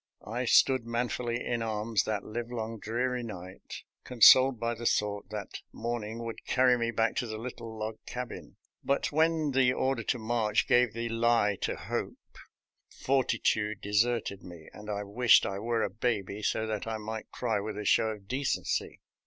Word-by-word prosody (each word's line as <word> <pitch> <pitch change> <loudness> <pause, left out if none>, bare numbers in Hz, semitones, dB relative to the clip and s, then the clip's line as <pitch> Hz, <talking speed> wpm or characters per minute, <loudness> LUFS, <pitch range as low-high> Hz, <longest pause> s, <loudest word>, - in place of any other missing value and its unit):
I 120 +4 -3
stood 130 +1 +4
man 115 +1 -1
fully 120 0 -3
in 120 -1 -1
arms 110 -2 0
that 105 -2 -2
livelong, 115 0 -5
dreary 125 +4 -1
night, 95 -5 -9 0.2
con 125 -2 -9
soled 130 +2 +8
by 115 +1 -1
the 120 0 -3
thought 105 -2 0
that 105 -2 -6
morning 115 -1 -4
would 115 - -7
carry 130 -1 +3
me 115 -1 -1
back 115 0 0
to 125 - -1
the 110 -1 -5
little 115 -1 -7
log 110 0 -5
cabin; 125 -1 -7 0.3
but 140 - 0
when 160 0 +2
the 130 -1 +3
order 130 -2 0
to 125 - 0
march 110 -2 0
gave 120 -3 +4
the 115 +1 -3
lie 115 -3 +2
to - - -1
hope, - - -4 0.7
fortitude 115 -5 0
deserted 105 -1 0
me, 85 -3 -12
and 105 0 -10
I 105 0 -2
wished 115 +4 +4
I 100 0 -3
were 115 +1 0
a - - 0
baby, 105 -2 -2
so 110 +1 0
that 110 -1 -3
I 110 -1 -2
might 110 +1 -6
cry 115 -4 -1
with 105 +1 -5
a 105 - -5
show 110 - +4
of 105 -3 -6
decency. 135 +4 -2
115 Hz, 180 wpm, -29 LUFS, 105-120 Hz, 0.7 s, soled